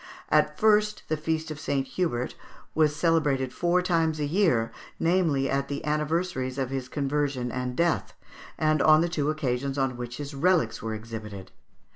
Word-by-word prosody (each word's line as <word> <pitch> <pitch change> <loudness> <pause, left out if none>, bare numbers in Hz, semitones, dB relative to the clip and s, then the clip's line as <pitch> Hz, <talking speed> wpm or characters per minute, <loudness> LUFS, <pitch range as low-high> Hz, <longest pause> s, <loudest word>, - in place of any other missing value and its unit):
At - - +3
first 210 -2 +3
the 155 - +2
feast 160 +1 -2
of 155 - -6
St. 140 -3 -1
Hubert 130 -4 -1 0.4
was 155 -2 +3
celebrated 145 -6 +1
four 175 +1 +1
times 165 -3 +1
a 150 - 0
year, 150 - +2 0.3
namely, 165 -6 +2
at 140 +1 0
the 140 0 -4
anniversaries 150 -3 -1
of 135 -1 -2
his 130 -2 -3
conversion 140 -3 -1
and 125 0 -3
death, 170 +3 0 0.4
and 155 -2 +2
on 155 0 +6
the 170 - +1
two 150 -4 -1
occasions 140 -2 -1
on 135 -2 0
which 120 0 -6
his 145 0 -6
relics 155 -5 +2
were 110 -1 -3
exhibited. 110 -4 -8
145 Hz, 165 wpm, -27 LUFS, 130-165 Hz, 0.4 s, on